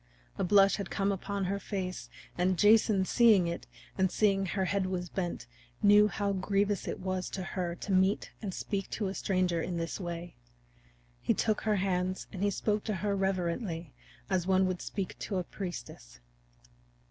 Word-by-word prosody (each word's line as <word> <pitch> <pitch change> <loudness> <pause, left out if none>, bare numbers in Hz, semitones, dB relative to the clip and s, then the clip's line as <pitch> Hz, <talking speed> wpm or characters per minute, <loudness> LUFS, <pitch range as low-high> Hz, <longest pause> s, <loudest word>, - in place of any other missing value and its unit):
A - - +1
blush 195 +1 +5
had 200 -3 -4
come 195 0 0
upon 200 0 -2
her 200 +2 -1
face, 185 - -4 0.3
and 180 +1 +1
Jason 210 -1 +5
seeing 220 -4 +5
it, 170 0 -4 0.3
and 190 -1 +3
seeing 195 -2 +2
how - - -3
her 190 -2 +1
head 195 0 0
was 180 -1 -3
bent, 175 -9 -3 0.4
knew 205 +1 +7
how 200 0 -1
grievous 200 +1 0
it - - -3
was 185 -1 -2
to 190 - -4
her 175 0 -3
to 195 - -6
meet 190 +2 +2
and 205 -4 -3
speak 195 +1 -3
to 205 -3 -2
a - - -4
stranger 185 -4 0
in 175 +1 -3
this 165 +3 -3
way. 175 -1 -5 0.9
He - - +1
took 215 -2 +1
her 215 -1 +1
hand 185 -1 -1
and 190 - -5
he 205 - +3
spoke 210 +1 -1
to 215 - -1
her 200 -1 +1
reverently, 180 - -2 0.3
as 185 -2 0
one 190 0 +4
would 185 -1 -2
speak 195 -3 -4
to 195 - -3
a 180 - 0
priestess. 165 - -8
190 Hz, 180 wpm, -31 LUFS, 180-200 Hz, 0.9 s, knew